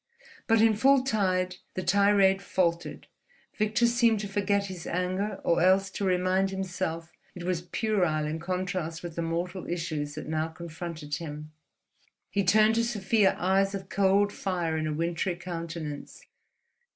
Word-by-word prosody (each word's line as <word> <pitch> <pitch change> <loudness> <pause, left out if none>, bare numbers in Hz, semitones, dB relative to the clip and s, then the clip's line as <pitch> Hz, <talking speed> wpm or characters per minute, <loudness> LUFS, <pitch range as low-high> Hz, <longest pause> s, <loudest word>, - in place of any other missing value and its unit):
But 225 -1 +4
in 225 -1 +5
full 265 +4 +4
tide 185 -7 0 0.2
the 185 - -2
tirade 200 +1 +4
faltered, 170 -3 -1 0.5
Victor 215 +2 +2
seemed 235 -2 +3
to 205 - -4
forget 200 0 0
his 185 -4 -7
anger 185 +4 -2
or 170 - +2
else 190 +1 +4
to 200 - -4
remind 185 +1 +2
himself 180 -3 -4 0.2
it 180 - -7
was 180 -1 -1
puerile 175 -5 0
in 155 +2 -3
contrast 180 -2 -3
with 170 -2 -6
the 170 - -2
mortal 175 +3 -3
issues 155 -4 -3
that 155 - -6
now 155 0 -1
confronted 160 -2 -6
him. 150 -2 -7 0.8
He 200 - +1
turned 215 +4 +5
to 230 - +2
Sofia 210 -3 +2
eyes 195 +2 +2
of 190 -1 -7
cold 200 +1 +3
fire 175 -4 -2
in 155 0 -1
a 155 - -1
wintry 170 +3 -1
countenance. 165 -4 -6
185 Hz, 150 wpm, -28 LUFS, 165-200 Hz, 0.8 s, in